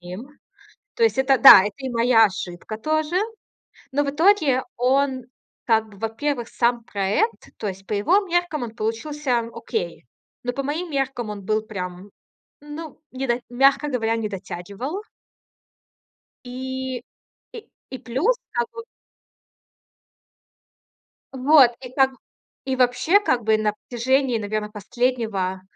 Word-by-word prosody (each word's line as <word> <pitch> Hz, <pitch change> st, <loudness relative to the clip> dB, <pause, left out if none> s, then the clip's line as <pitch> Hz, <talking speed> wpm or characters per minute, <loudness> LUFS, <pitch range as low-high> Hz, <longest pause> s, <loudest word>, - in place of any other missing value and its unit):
ним. 180 Hz, +8 st, -8 dB, 0.7 s
То 465 Hz, -, +1 dB
есть 450 Hz, -, +3 dB
это 265 Hz, 0 st, +3 dB
да, 270 Hz, -, +11 dB
это 205 Hz, 0 st, -3 dB
и 265 Hz, -1 st, -5 dB
моя 230 Hz, -1 st, +5 dB
ошибка 190 Hz, +1 st, -5 dB
тоже. 310 Hz, +6 st, -1 dB, 0.8 s
Но 290 Hz, +2 st, +2 dB
в 280 Hz, -, -1 dB
итоге 305 Hz, -5 st, +3 dB
он 260 Hz, +1 st, +1 dB, 0.4 s
как 220 Hz, -2 st, +2 dB
бы, 200 Hz, -, -16 dB
во-первых, 235 Hz, +3 st, -2 dB
сам 235 Hz, 0 st, +1 dB
проект, 205 Hz, -, -1 dB
то 210 Hz, -, -4 dB
есть 195 Hz, 0 st, -8 dB
по -, -, -6 dB
его 275 Hz, -, +3 dB
меркам 350 Hz, -5 st, -1 dB
он 225 Hz, -2 st, -5 dB
получился 250 Hz, +4 st, -2 dB, 0.2 s
окей. 445 Hz, -, -4 dB, 0.4 s
Но 245 Hz, 0 st, -2 dB
по 275 Hz, -, -3 dB
моим 320 Hz, +5 st, -3 dB
меркам 265 Hz, -5 st, -2 dB
он 200 Hz, -2 st, -7 dB
был 215 Hz, +2 st, 0 dB
прям, 185 Hz, -2 st, -7 dB, 0.5 s
ну, 295 Hz, +1 st, -9 dB
не 265 Hz, +1 st, -3 dB
до 240 Hz, +1 st, +1 dB
мягко 275 Hz, +4 st, +3 dB
говоря, 230 Hz, -4 st, 0 dB
не 220 Hz, -2 st, -2 dB
дотягивал. 200 Hz, -, -6 dB, 1.4 s
И 260 Hz, 0 st, -5 dB, 0.5 s
и 455 Hz, -2 st, -10 dB, 0.2 s
и 260 Hz, -, -6 dB
плюс 285 Hz, -, 0 dB, 0.2 s
как 475 Hz, 0 st, 0 dB
вот 455 Hz, -1 st, -9 dB, 2.5 s
Вот. 265 Hz, -1 st, +6 dB
И 250 Hz, -2 st, -9 dB
там 265 Hz, -1 st, +2 dB, 0.5 s
И 265 Hz, -1 st, -1 dB
вообще, 255 Hz, +10 st, +3 dB
как 250 Hz, -12 st, 0 dB
бы, 220 Hz, 0 st, +4 dB
на 215 Hz, -1 st, 0 dB, 0.2 s
протяжении, 255 Hz, 0 st, +1 dB
наверное, 210 Hz, 0 st, -3 dB
последнего 210 Hz, -3 st, -2 dB
250 Hz, 135 wpm, -23 LUFS, 220-280 Hz, 2.5 s, да